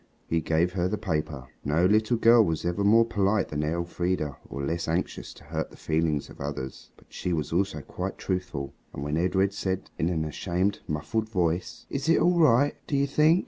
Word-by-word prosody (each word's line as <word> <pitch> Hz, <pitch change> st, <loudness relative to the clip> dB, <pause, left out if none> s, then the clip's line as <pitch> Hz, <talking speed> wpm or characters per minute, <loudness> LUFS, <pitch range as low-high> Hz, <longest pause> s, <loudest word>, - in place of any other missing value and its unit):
he 85 Hz, 0 st, 0 dB
gave 85 Hz, +3 st, +1 dB
her 90 Hz, -1 st, +1 dB
the 105 Hz, +3 st, -1 dB
paper. 75 Hz, -9 st, -3 dB, 0.2 s
No 75 Hz, +5 st, +2 dB
little 110 Hz, +4 st, +3 dB
girl 115 Hz, 0 st, +7 dB
was 80 Hz, -4 st, -1 dB
ever 90 Hz, +3 st, 0 dB
more 115 Hz, +3 st, +6 dB
polite 100 Hz, -2 st, +1 dB
than 75 Hz, 0 st, -2 dB
Elfrida 85 Hz, -2 st, -1 dB
or 70 Hz, -, -5 dB
less 85 Hz, +3 st, -2 dB
anxious 85 Hz, +3 st, -2 dB
to -, -, -15 dB
hurt -, -, -3 dB
the -, -, -15 dB
feelings 80 Hz, -2 st, 0 dB
of -, -, -13 dB
others. 70 Hz, -2 st, -5 dB
But -, -, -21 dB
she 90 Hz, -, -2 dB
was 80 Hz, -1 st, -2 dB
also 90 Hz, -4 st, 0 dB
quite 90 Hz, +7 st, -5 dB
truthful, 90 Hz, -7 st, -3 dB, 0.2 s
and 70 Hz, -, -4 dB
when 75 Hz, +1 st, -1 dB
Edred 95 Hz, +3 st, +2 dB
said 95 Hz, -1 st, -3 dB
in 80 Hz, -, +2 dB
an 80 Hz, -3 st, -1 dB
ashamed, 90 Hz, +6 st, -1 dB
muffled 75 Hz, +9 st, -2 dB
voice, 90 Hz, -3 st, -1 dB
"Is 140 Hz, +3 st, -2 dB
it 165 Hz, -, +5 dB
all 175 Hz, 0 st, +3 dB
right, 145 Hz, -1 st, +5 dB
do 140 Hz, -, 0 dB
you 140 Hz, -, +3 dB
think?" 155 Hz, +5 st, +4 dB
90 Hz, 200 wpm, -27 LUFS, 80-105 Hz, 0.2 s, girl